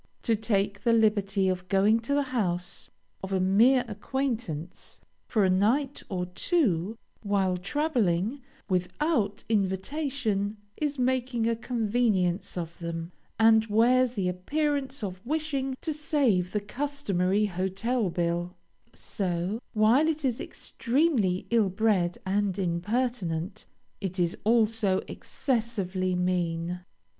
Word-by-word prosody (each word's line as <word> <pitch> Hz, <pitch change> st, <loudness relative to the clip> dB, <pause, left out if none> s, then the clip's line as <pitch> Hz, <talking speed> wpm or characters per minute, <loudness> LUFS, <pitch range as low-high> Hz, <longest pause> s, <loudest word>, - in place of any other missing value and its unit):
To 230 Hz, -, +2 dB
take 205 Hz, -2 st, 0 dB
the 230 Hz, +2 st, +3 dB
liberty 205 Hz, -3 st, +2 dB
of 185 Hz, -1 st, -1 dB
going 200 Hz, +4 st, +4 dB
to 235 Hz, +5 st, -1 dB
the 285 Hz, -, +2 dB
house 180 Hz, -5 st, -1 dB, 0.3 s
of 190 Hz, -, -6 dB
a 190 Hz, -, +1 dB
mere 230 Hz, +8 st, +4 dB
acquaintance, 215 Hz, -, -4 dB, 0.3 s
for 215 Hz, -5 st, +2 dB
a -, -, +3 dB
night 250 Hz, +9 st, +1 dB
or 180 Hz, -3 st, -2 dB
two, 200 Hz, -, 0 dB, 0.2 s
while 195 Hz, -3 st, +1 dB
traveling, 220 Hz, -, 0 dB, 0.3 s
without 200 Hz, -, 0 dB
invitation, 215 Hz, +1 st, -1 dB, 0.2 s
is 295 Hz, -2 st, -2 dB
making 250 Hz, -2 st, 0 dB
a 230 Hz, -, +2 dB
convenience 220 Hz, -6 st, 0 dB
of 170 Hz, -1 st, -5 dB
them, 170 Hz, 0 st, -5 dB, 0.3 s
and 220 Hz, 0 st, +5 dB
wears 240 Hz, +3 st, +4 dB
the 195 Hz, -6 st, -1 dB
appearance 275 Hz, -, -1 dB
of 185 Hz, -1 st, -5 dB
wishing 275 Hz, -2 st, -2 dB
to 315 Hz, -, -1 dB
save 265 Hz, -, +1 dB
the 210 Hz, -, -1 dB
customary 210 Hz, -6 st, 0 dB
hotel 195 Hz, +4 st, -1 dB
bill, 175 Hz, +1 st, -1 dB, 0.4 s
so, 185 Hz, +2 st, -2 dB
while 230 Hz, +8 st, +4 dB
it 310 Hz, -2 st, -1 dB
is 245 Hz, -3 st, 0 dB
extremely 235 Hz, -, 0 dB
ill 225 Hz, -4 st, +4 dB
bred 190 Hz, -3 st, +1 dB
and 195 Hz, 0 st, 0 dB
impertinent, 190 Hz, -1 st, -2 dB, 0.3 s
it 190 Hz, -2 st, -4 dB
is 175 Hz, -1 st, +1 dB
also 220 Hz, -3 st, +3 dB
excessively 200 Hz, -8 st, -1 dB
mean. 180 Hz, -1 st, -1 dB
210 Hz, 120 wpm, -28 LUFS, 185-250 Hz, 0.4 s, and